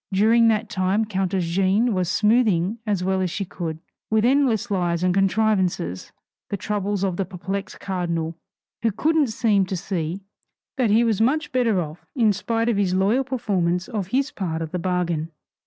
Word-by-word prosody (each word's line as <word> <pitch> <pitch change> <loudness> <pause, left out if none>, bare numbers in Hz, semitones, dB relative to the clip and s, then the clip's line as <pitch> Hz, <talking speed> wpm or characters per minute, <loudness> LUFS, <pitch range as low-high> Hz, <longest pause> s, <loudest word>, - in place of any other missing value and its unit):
During 225 +4 +4
that 220 0 +1
time 200 +2 0
countess 190 -3 -1
Jeanne 195 +7 +2
was 180 -2 0
smoothing 215 -2 +2
as 200 -4 0
well 190 0 +1
as 185 - 0
she 195 +4 -3
could, 165 -3 -5 0.3
with 220 0 +2
endless 245 -4 +2
lies 175 -3 0
and 185 -1 +2
contrivances, 195 - 0 0.4
the 200 - -2
troubles 205 0 -2
of 185 -3 -1
the 195 - +1
perplexed 190 +2 -5
cardinal, 170 -3 -2 0.5
who 230 - +2
"couldn't 310 +7 +2
seem 215 -4 +1
to 190 - -3
see" 175 0 -3 0.5
that 255 -5 +1
he 220 +3 +4
was 225 -3 +1
much 295 +6 +1
better 235 -6 +2
off 160 0 -6
in 225 -5 +3
spite 225 +3 -1
of 235 -4 +1
his 190 -2 +1
loyal 205 +8 +2
performance 190 -9 -1
of 210 -7 -3
his 270 +7 0
part 165 -4 -3
of 160 - -7
the 180 - -2
bargain. 170 -3 -1
195 Hz, 175 wpm, -23 LUFS, 180-225 Hz, 0.5 s, During